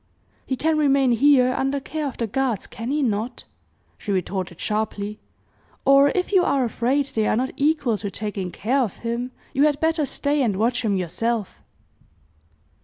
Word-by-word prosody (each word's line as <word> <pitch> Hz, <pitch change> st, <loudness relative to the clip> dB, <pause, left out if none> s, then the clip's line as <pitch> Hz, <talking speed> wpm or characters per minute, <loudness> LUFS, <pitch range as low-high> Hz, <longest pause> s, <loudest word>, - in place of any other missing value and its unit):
"He 260 Hz, -, 0 dB
can 310 Hz, +3 st, +1 dB
remain 275 Hz, -3 st, +3 dB
here 255 Hz, +1 st, +4 dB
under 270 Hz, +2 st, 0 dB
care 305 Hz, +2 st, -4 dB
of 265 Hz, -, -6 dB
the 230 Hz, -, -1 dB
guards, 235 Hz, -1 st, -1 dB
can 230 Hz, +2 st, -7 dB
he 295 Hz, +1 st, +1 dB
not?" 225 Hz, +1 st, -2 dB, 0.6 s
she 205 Hz, -, -4 dB
retorted 185 Hz, -2 st, -2 dB
sharply. 210 Hz, -1 st, -2 dB, 0.7 s
"Or, 275 Hz, +1 st, +6 dB
if 365 Hz, +1 st, -1 dB
you 375 Hz, -3 st, +5 dB
are 275 Hz, -6 st, +2 dB
afraid 250 Hz, +5 st, 0 dB
they 220 Hz, -5 st, -1 dB
are -, -, +2 dB
not 255 Hz, +3 st, -1 dB
equal 285 Hz, -6 st, +1 dB
to 205 Hz, -, -4 dB
taking 200 Hz, -2 st, -4 dB
care 235 Hz, +9 st, 0 dB
of 225 Hz, -6 st, -2 dB
him, 235 Hz, +2 st, -2 dB, 0.2 s
you 280 Hz, +3 st, +4 dB
had 295 Hz, -2 st, +1 dB
better 320 Hz, -2 st, +1 dB
stay 285 Hz, +1 st, 0 dB
and 215 Hz, -7 st, +1 dB
watch 235 Hz, +3 st, +1 dB
him 205 Hz, -3 st, +1 dB
yourself." 210 Hz, +4 st, -2 dB
250 Hz, 175 wpm, -23 LUFS, 215-280 Hz, 0.7 s, Or